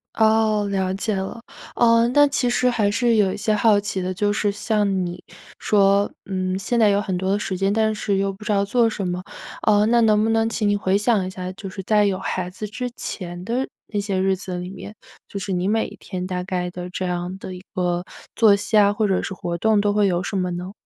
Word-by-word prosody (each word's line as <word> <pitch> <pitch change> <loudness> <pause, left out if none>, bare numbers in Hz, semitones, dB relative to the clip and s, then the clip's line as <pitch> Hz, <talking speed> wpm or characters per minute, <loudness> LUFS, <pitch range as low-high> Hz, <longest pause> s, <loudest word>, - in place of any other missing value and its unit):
哦， 220 -1 +3
了 190 -1 0
解 205 +2 -1
了。 190 +4 -4 0.4
呃， 230 0 +4
那 290 +3 +5
其 275 -3 0
实 250 +1 +2
还 220 -4 +1
是 230 +2 +2
有 200 -3 +3
一 - - -5
些 215 +1 0
好 210 0 +4
奇 200 -2 -3
的， 185 +1 -2
就 205 +2 0
是 205 -1 0
像 200 -3 0
你 175 +1 -7 0.4
说， 200 -1 +3
嗯， 185 -1 -2
现 235 +5 -1
在 215 -2 +5
有 200 0 +3
很 195 -3 -3
多 190 +1 -1
的 200 - +2
时 190 -2 -3
间， 195 +1 +1
但 220 +1 +2
是 205 -2 -1
又 195 0 0
不 195 +3 -13
知 215 - -2
道 200 -1 +2
做 230 +3 +2
什 200 -4 -3
么。 180 0 -3 0.4
呃， 210 -1 +4
那 235 +1 +4
能 215 -1 +4
不 220 - +1
能 225 0 +2
请 220 -2 -1
你 205 - +3
回 195 -1 +1
想 210 -2 +1
一 - - -4
下， 185 -1 -6
就 195 +1 -8
是 190 0 -7
在 210 +1 +3
有 195 -2 0
孩 185 -1 -3
子 205 +4 -6
之 250 +4 -4
前 175 -2 -6
的 245 +5 -1 0.3
那 205 - +1
些 200 -2 -1
日 190 0 +2
子 185 -1 -6
里 180 +1 -5
面， 205 +2 -9 0.3
就 200 - -6
是 195 0 -4
你 180 +1 -1
每 220 +2 +1
天 185 -2 -5
大 180 -1 -3
概 180 -1 -3
的 180 0 -7
这 185 +1 -4
样 180 +1 -3
的 190 -1 -8
一 180 - -9
个 175 -1 0 0.3
作 215 -3 +6
息 205 +2 -2
啊， 205 -1 +6
或 210 0 0
者 190 -2 +1
是 - - -5
活 170 -1 -4
动 215 +3 +3
都 205 0 +1
会 205 -1 +3
有 180 -1 0
什 190 - -4
么 180 -1 0
呢？ 180 +2 -5
200 Hz, 265 characters per minute, -22 LUFS, 185-215 Hz, 0.4 s, 作